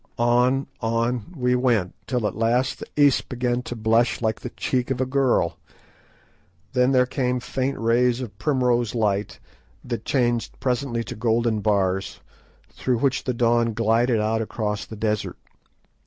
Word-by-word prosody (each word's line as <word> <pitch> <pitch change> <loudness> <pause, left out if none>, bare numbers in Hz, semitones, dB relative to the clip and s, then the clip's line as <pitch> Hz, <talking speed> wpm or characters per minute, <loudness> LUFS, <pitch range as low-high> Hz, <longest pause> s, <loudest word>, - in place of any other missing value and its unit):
On, 125 +3 +2
on 115 +3 -1
we 125 -1 +1
went, 120 -7 +1
till 125 -4 -1
at - - -1
last 120 +3 +1
the - - -8
east 145 -3 +4
began 125 -1 -1
to 120 - -6
blush 115 +1 +2
like 110 -2 -1
the 125 - -6
cheek 125 +1 -2
of 130 -2 -1
a 130 - +1
girl. 130 - +1 1.1
Then 125 0 +3
there 130 -1 +4
came 125 -1 -1
faint 130 +2 -2
rays 120 +2 +2
of 115 -6 -6
primrose 125 -4 +1
light, 105 -3 -1 0.4
that 120 -2 -4
changed 120 -3 0
presently 125 -2 -1
to - - -7
golden 115 0 +1
bars, 95 -2 0 0.5
through 125 -2 -1
which 135 +2 0
the 125 - 0
dawn 115 -1 +2
glided 115 +1 +2
out 110 +1 0
across 105 -1 -3
the 110 - -8
desert. 105 -1 -2
120 Hz, 155 wpm, -23 LUFS, 110-125 Hz, 1.1 s, east